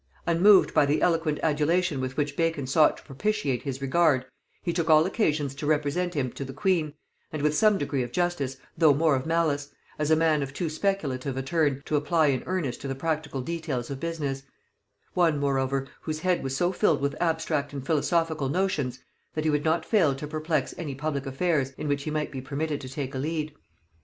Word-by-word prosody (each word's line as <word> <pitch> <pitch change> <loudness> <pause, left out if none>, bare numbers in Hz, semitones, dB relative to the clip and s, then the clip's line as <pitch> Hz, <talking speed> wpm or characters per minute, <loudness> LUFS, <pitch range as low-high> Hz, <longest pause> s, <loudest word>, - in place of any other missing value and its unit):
Unmoved 185 +4 +5
by - - +5
the 145 +2 +2
eloquent 165 -3 +1
adulation 155 0 +1
with 130 0 -4
which 145 -1 -1
Bacon 165 -4 0
sought 150 +4 +4
to - - -15
propitiate 145 - -1
his 135 -1 -5
regard, 135 -2 +3 0.4
he 170 - -1
took 165 -1 -1
all 155 0 +6
occasions 155 - 0
to 145 +2 -5
represent 155 +4 0
him 130 -4 -1
to - - -6
the 135 -1 -8
queen, 155 -2 0 0.4
and 155 -2 -4
with 150 0 +3
some 215 0 +4
degree 145 -3 -1
of 120 -1 -4
justice 175 -5 -1 0.2
though 155 -4 +5
more 155 -1 +3
of 130 +3 -3
malice, 155 -4 +1 0.3
as 150 0 0
a 160 - +6
man 155 -2 +2
of 140 0 -5
too 170 +1 -1
speculative 150 -7 -2
a 135 - -2
turn 145 -2 0
to 155 - -1
apply 155 +2 +2
in 130 -2 0
earnest 170 -9 -2
to 140 - -5
the 135 - -3
practical 150 -2 -2
details 145 -5 -3
of 135 - -5
business; 145 -5 -3 0.7
one 165 -4 +3
moreover 135 -1 0
whose 155 -1 -4
head 180 0 +1
was 135 0 -2
so 175 +4 +2
filled 180 -5 +2
with 140 +1 -1
abstract 160 -4 0
and 140 -2 -6
philosophical 160 -1 +1
notions, 145 -7 -1 0.3
that 155 - -1
he 155 - +2
would 150 0 0
not 160 +1 +1
fail 170 - +3
to 135 - -6
perplex 155 -2 -1
any 150 -6 -4
public 140 -1 -3
affairs 135 -1 0
in 155 - -4
which 145 -1 -1
he - - -2
might 150 0 -2
be 130 - -5
permitted 145 +2 -3
to 130 - -7
take 135 0 -5
a 130 - -3
lead. 155 +1 -2
150 Hz, 205 wpm, -27 LUFS, 135-165 Hz, 0.7 s, all